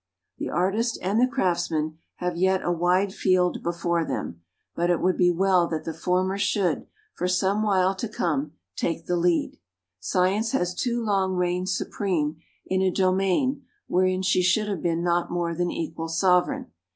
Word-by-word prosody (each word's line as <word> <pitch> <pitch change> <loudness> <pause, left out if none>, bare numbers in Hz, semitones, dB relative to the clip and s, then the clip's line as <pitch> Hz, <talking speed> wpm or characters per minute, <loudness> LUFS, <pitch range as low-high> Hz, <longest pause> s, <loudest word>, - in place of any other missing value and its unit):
The - - -3
artist 210 +7 0
and 200 +5 +1
the 255 - +5
craftsman 170 -8 -1 0.2
have 180 -1 -3
yet 190 +2 +2
a 175 - 0
wide 180 +3 +1
field 185 -2 +1
before 170 0 -1
them, 85 - -4 0.3
but 175 +1 0
it 175 - +2
would 185 0 +2
be 180 -1 +4
well 180 0 +3
that 160 -2 -3
the 165 - -4
former 185 +3 0
should, 190 -5 0 0.3
for 180 - -2
some 190 +3 +1
while 190 -3 +2
to 225 +3 -3
come, 150 -8 -1 0.2
take 165 -1 -2
the 180 - 0
lead. 175 -1 +1 0.4
Science 190 - +1
has 180 -9 0
too 240 +4 -1
long 195 -3 +1
reigned 180 +1 0
supreme 170 -5 -1 0.3
in 190 0 0
a 190 - +3
domain 195 +8 +1 0.2
wherein 185 +1 +1
she 185 -1 +3
should 190 +4 +2
have 195 -6 -3
been 170 0 0
not 175 0 +1
more 175 -1 -1
than 175 +1 -1
equal 165 -1 -4
sovereign. 180 - +1
180 Hz, 170 wpm, -25 LUFS, 170-190 Hz, 0.4 s, the